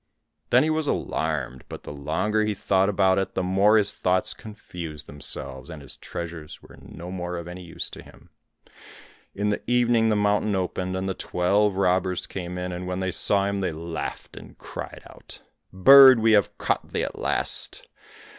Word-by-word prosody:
Then - - +5
he 155 - +1
was 155 -1 -1
alarmed, 70 - -2
but - - -8
the - - -7
longer 80 +10 0
he 105 -1 -1
thought 95 0 +2
about 95 -1 +3
it 95 0 -3
the 95 - 0
more 100 +4 +4
his 105 -2 +2
thoughts 90 0 +1
confused 85 -7 -9
themselves, 65 -2 -5
and 80 - -8
his 70 -3 -4
treasures 85 -3 -7
were - - -16
no 90 +2 -9
more 90 -1 -4
of 85 0 -7
any 90 +1 -8
use 85 -2 -5
to - - -9
him. - - -18 1.0
In 105 +1 0
the 105 - -2
evening 120 -2 +3
the 110 - +2
mountain 105 0 +1
opened, 95 0 -2
and 95 +1 -3
the 95 - -1
twelve 100 +3 +1
robbers 95 -1 +1
came 90 -1 -6
in, 90 0 -4
and 90 +1 -5
when 90 0 -3
they 95 -1 -1
saw 100 +2 +2
him 100 0 -1
they 95 -3 -1
laughed, 80 +1 -6
and - - -12
cried - - -8
out, - - -14 0.3
"Bird, 130 +7 +9
have 105 -2 +5
we - - -34
caught - - -1
thee - - -2
at - - -5
last! - - -2
95 Hz, 185 wpm, -25 LUFS, 85-105 Hz, 1.0 s, Bird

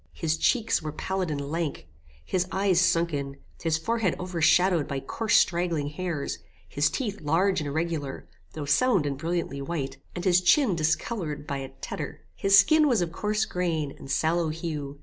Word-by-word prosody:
His 155 - -1
cheeks 225 +6 +1
were 155 -1 -4
pallid 190 +3 -2
and 145 -2 -2
lank, 165 - -3 0.4
his 185 -1 0
eyes 190 -2 +2
sunken, 155 -6 0 0.2
his 160 -1 +1
forehead 225 +2 0
overshadowed 180 -1 +2
by 140 - -3
coarse 220 +11 +1
straggling 170 -5 +1
hairs, 155 -2 -4 0.3
his 145 +1 +1
teeth 210 -6 -3
large 180 +5 +2
and 150 - -4
irregular, 155 -2 -3 0.3
though 150 -2 -5
sound 180 - +3
and 140 -1 -1
brilliantly 165 -1 -3
white, 135 -3 -4 0.2
and 175 - -4
his 180 -1 +4
chin 195 - +4
discoloured 155 -1 -1
by 140 -2 -3
a 135 -1 -6
tetter. - - -5
His 195 0 +4
skin 310 +6 +6
was 240 -8 +2
of 165 - -4
coarse 210 +4 0
grain, 165 -7 -2
and 135 - -12
sallow 160 +3 +1
hue. 150 -3 -5
170 Hz, 170 wpm, -27 LUFS, 150-185 Hz, 0.4 s, skin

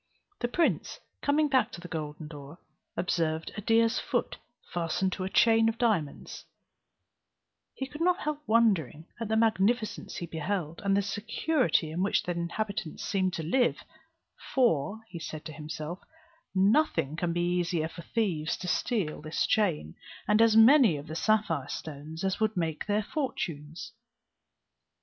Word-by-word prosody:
The 240 - 0
prince 330 +7 0 0.2
coming 295 +1 +3
back 265 -2 +2
to - - -7
the 175 - -9
golden 150 -2 -5
door, 145 +1 -10 0.4
observed 160 -2 -1
a 210 - -4
deer's 230 +3 +3
foot - - -2 0.4
fastened 175 +2 0
to 185 - -4
a 185 - -2
chain 225 +2 +5
of 225 - -4
diamonds; 205 - -1 1.3
he 265 - -3
could 295 +4 -9
not 360 +1 +2
help 300 0 -2
wondering 195 - +2
at 230 - -3
the 220 - 0
magnificence 220 0 +1
he 175 - -4
beheld, 165 0 -3
and 195 0 +2
the 200 - +2
security 225 - 0
in 170 +3 -2
which 195 - +2
the 180 - -2
inhabitants 175 +1 -3
seemed 185 -2 0
to 160 - -3
live; 240 +10 +1 0.7
"for," 220 - +2 0.2
said 155 -1 -6
he - - -36
to 155 - -6
himself, 155 +3 -6 0.6
"nothing 190 - +3
can 170 +1 -1
be 175 +1 +1
easier 170 -2 0
than - - -13
for 170 - -9
thieves 170 -7 -1
to 180 - -6
steal 185 -6 -1
this 155 +1 -1
chain, 170 - +1 0.3
and 210 +2 +4
as 225 -1 +5
many 230 - +7
of 145 - -8
the 160 - -7
sapphire 215 +4 +1
stones 155 +2 -6
as 190 -1 0
would 220 -2 0
make 160 -1 -2
their 210 +1 +1
fortunes." 170 - -4
190 Hz, 160 wpm, -29 LUFS, 160-225 Hz, 1.3 s, many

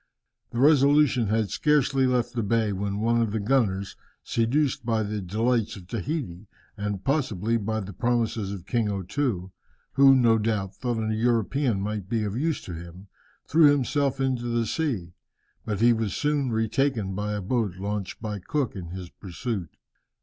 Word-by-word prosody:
The - - -7
Resolution 140 -3 +4
had 110 -2 0
scarcely 135 -1 +2
left 125 -2 0
the 120 - -1
bay, 110 -1 +1
when 100 +1 -2
one 115 +1 +2
of 115 - +1
the 110 - -1
gunners, 100 -4 0 0.3
seduced 125 +5 0
by 115 -2 0
the 105 0 -3
delights 110 +5 0
of 95 - -11
Tahiti, 110 - -4 0.3
and 105 -2 -4
possibly 115 - 0
by 110 0 -2
the 100 0 -7
promises 115 -3 0
of 95 -3 -7
King 115 -4 0
O 100 -2 -2
Too, 95 -4 -2 0.4
who, 135 0 +7
no 115 -3 +4
doubt, 105 -3 -1
thought 120 -2 -2
a 110 - 0
European 115 0 +1
might 105 -2 -4
be 115 -1 0
of 105 0 -3
use 155 +5 -1
to 90 - -7
him, 85 +4 -10 0.4
threw 155 0 +6
himself 140 -1 +1
into 130 -3 0
the 120 -1 0
sea, 110 - -2 0.5
but 105 -2 -2
he 120 0 +6
was 110 -3 -2
soon 145 -3 0
retaken 110 -2 0
by 105 +2 -2
a 105 - -2
boat 105 -2 -1
launched 100 0 -4
by 105 -2 -3
Cook 130 +6 -2
in 90 -3 -6
his 90 0 -8
pursuit. 95 -1 -5
110 Hz, 170 wpm, -26 LUFS, 100-130 Hz, 0.5 s, who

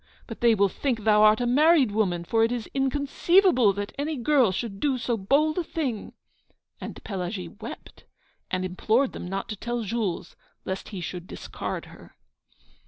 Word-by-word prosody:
_ - - -39 0.2
but 230 - -9
they 235 -1 +5
will 200 -1 +4
think 230 +2 -2
thou 210 -1 +5
art 215 +1 +6
a 245 - 0
married 285 0 +4
woman, 190 -5 0
for 225 +6 +2
it 225 - +2
is 240 -3 -3
inconceivable 280 - +3
that 200 +1 -5
any 305 +2 -1
girl 255 -3 +3
should 195 +1 -4
do 275 0 +1
so 240 -1 -1
bold 285 - +2
a - - 0
thing." 275 -10 -4 0.7
And - - -8
Pelagie 185 -2 -4
wept, - - -10 0.4
and 185 0 -1
implored 220 +8 +1
them - - -6
not 195 +2 -4
to 215 - -3
tell 240 +3 -3
Jules, 205 -5 -3 0.3
lest 190 +1 -4
he 195 -4 -6
should 175 0 -6
discard - - -6
her.' - - -15
225 Hz, 175 wpm, -26 LUFS, 195-270 Hz, 0.7 s, art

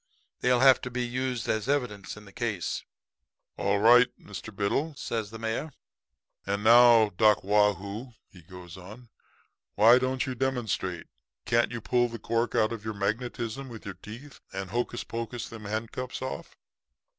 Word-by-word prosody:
They'll 125 0 +2
have 130 -1 +7
to 125 - -5
be 125 0 -2
used 125 0 -3
as 110 +3 -1
evidence 120 -9 -2
in 105 - -12
the 100 - -14
case.' 105 -6 -3 0.7
"'All 100 +1 +1
right, 120 +4 +7
Mr. 100 +2 -9
Biddle,' 140 +10 -1
says 110 -5 -3
the 115 - -8
mayor. 115 +7 -3 0.7
'And 100 +1 -2
now, 115 -1 +7
Doc 105 +2 +3
Waugh 105 +1 +4
hoo,' 100 +7 -8
he 90 - -16
goes 90 0 -12
on, 110 +7 -12 0.7
'why 115 +4 +7
don't 130 +2 -1
you 130 - -3
demonstrate? 120 -9 -2 0.4
Can't 120 0 +2
you 115 -1 -5
pull 120 +2 +2
the 115 - -6
cork 115 +1 -1
out 110 - +3
of 110 -2 -7
your 110 -1 -4
magnetism 115 +5 -3
with 115 -1 -10
your 100 - -5
teeth 115 +9 -11
and 95 -1 -5
hocus 120 +1 -2
pocus 115 0 -5
them 110 -2 -10
handcuffs 115 +5 -4
off?' 130 - -6
115 Hz, 165 wpm, -28 LUFS, 105-125 Hz, 0.7 s, have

